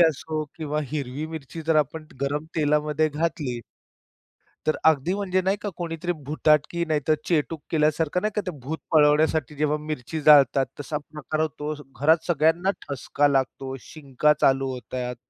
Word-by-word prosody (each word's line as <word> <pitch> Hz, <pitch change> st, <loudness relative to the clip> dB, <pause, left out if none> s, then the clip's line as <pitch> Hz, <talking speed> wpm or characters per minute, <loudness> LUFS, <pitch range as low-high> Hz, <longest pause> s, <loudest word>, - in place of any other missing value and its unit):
असो 160 Hz, -1 st, +2 dB
किंवा 150 Hz, -2 st, -2 dB
हिरवी 145 Hz, 0 st, -3 dB
मिरची 160 Hz, 0 st, -7 dB
जर 160 Hz, 0 st, +2 dB
आपण 155 Hz, +2 st, 0 dB
गरम 145 Hz, +2 st, -1 dB
तेलामध्ये 150 Hz, 0 st, +2 dB
घातली. 150 Hz, -5 st, -2 dB, 1.1 s
तर 155 Hz, -, +3 dB
अगदी 160 Hz, +2 st, +4 dB
म्हणजे 190 Hz, -2 st, 0 dB
नाही 190 Hz, +2 st, +1 dB
का 205 Hz, -, -3 dB
कोणीतरी 170 Hz, 0 st, -3 dB
भुताटकी 155 Hz, +3 st, +2 dB
नाहीतर 155 Hz, -1 st, +1 dB
चेटूक 160 Hz, -1 st, 0 dB
केल्यासारखं 155 Hz, +2 st, +1 dB
नाही 215 Hz, 0 st, 0 dB
का, 210 Hz, -, +1 dB
ते 180 Hz, -, -2 dB
भूत 155 Hz, +6 st, -4 dB
पळवण्यासाठी 150 Hz, -1 st, +3 dB
जेव्हा 150 Hz, +1 st, +1 dB
मिरची 155 Hz, 0 st, -5 dB
जाळतात, 140 Hz, -3 st, +6 dB
तसा 145 Hz, +1 st, -3 dB
प्रकार 155 Hz, 0 st, -4 dB
होतो. 155 Hz, -1 st, -2 dB, 0.3 s
घरात 160 Hz, +3 st, +4 dB
सगळ्यांना 165 Hz, +3 st, +2 dB, 0.2 s
ठसका 140 Hz, +2 st, +1 dB
लागतो, 135 Hz, -1 st, -1 dB
शिंका 150 Hz, 0 st, 0 dB
चालू 135 Hz, 0 st, +3 dB
होतात. 125 Hz, 0 st, -5 dB
150 Hz, 145 wpm, -25 LUFS, 145-160 Hz, 1.1 s, जाळतात